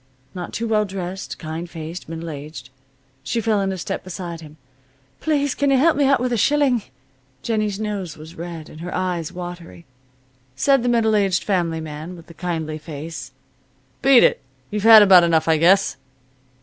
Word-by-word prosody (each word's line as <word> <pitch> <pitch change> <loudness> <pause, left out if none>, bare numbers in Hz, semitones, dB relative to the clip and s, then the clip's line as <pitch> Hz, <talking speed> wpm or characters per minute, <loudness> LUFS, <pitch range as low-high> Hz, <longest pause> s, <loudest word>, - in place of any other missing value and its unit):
Not 180 -2 -6
too 230 - -3
well 215 -1 +2
dressed, 190 -1 -6
kind 160 +1 -6
faced, 165 0 -8
middle 165 0 -6
aged. 145 -1 -9 0.5
She 225 - -2
fell 215 -2 +1
into 195 -1 -2
step 170 - -4
beside 175 -2 -7
him. 155 -1 -13 0.6
"Please, 285 -3 0
can 285 -1 0
you 270 - +4
help 320 +5 +4
me 285 - +2
out 275 +1 +4
with 250 0 -1
a - - +1
shilling?" 275 0 +2 0.6
Jennie's 215 -3 -1
nose 200 -6 -4
was 155 +2 -11
red, 170 -2 -7
and 155 - -12
her 175 +1 -6
eyes 180 -2 -2
watery. 175 -1 -9 0.7
Said 275 - +3
the 245 - 0
middle 225 -2 +2
aged 195 -3 +1
family 170 -5 0
man 155 +3 -7
with 170 -2 -13
the 170 - -14
kindly 160 -3 -4
face: 150 -3 -8 0.7
"Beat 270 -2 +6
it. - - +3 0.3
You've 210 0 -2
had 220 0 +9
about 185 -3 +7
enough 165 -2 +2
I 160 -1 +4
guess." 180 +5 +3
180 Hz, 175 wpm, -21 LUFS, 165-220 Hz, 0.7 s, had